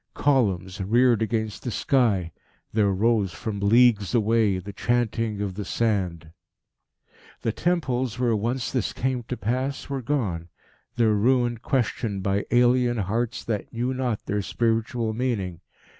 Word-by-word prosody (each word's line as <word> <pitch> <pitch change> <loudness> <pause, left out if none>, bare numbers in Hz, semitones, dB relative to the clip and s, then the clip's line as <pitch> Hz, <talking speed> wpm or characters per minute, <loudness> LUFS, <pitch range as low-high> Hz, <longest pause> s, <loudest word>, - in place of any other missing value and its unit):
Columns 100 -9 +1
reared 120 +4 +3
against 110 -1 -2
the 125 - -4
sky. 110 -9 +1 0.4
There 105 -2 +3
rose, 105 -1 +1
from 105 -3 -4
leagues 110 0 +4
away, 110 -3 +3
the 100 +2 -7
chanting 115 -2 0
of 100 -2 -2
the 105 +2 -5
sand. 95 -8 -1 1.1
The - - +1
temples, 130 -9 -1
where 120 -2 +2
once 120 +4 -2
this 125 -6 -1
came 130 -1 -1
to 120 +2 -5
pass, 130 +7 -2
were 135 -1 -2
gone, 105 - -2 0.5
their 115 -3 +3
ruin 120 +2 +2
questioned 115 -6 -1
by 100 +1 0
alien 120 0 +3
hearts 115 +5 -2
that 110 -3 -3
knew 120 +3 -1
not 125 -4 -2
their 105 0 -1
spiritual 115 +1 -1
meaning. 110 -8 -2
115 Hz, 140 wpm, -25 LUFS, 100-125 Hz, 1.1 s, leagues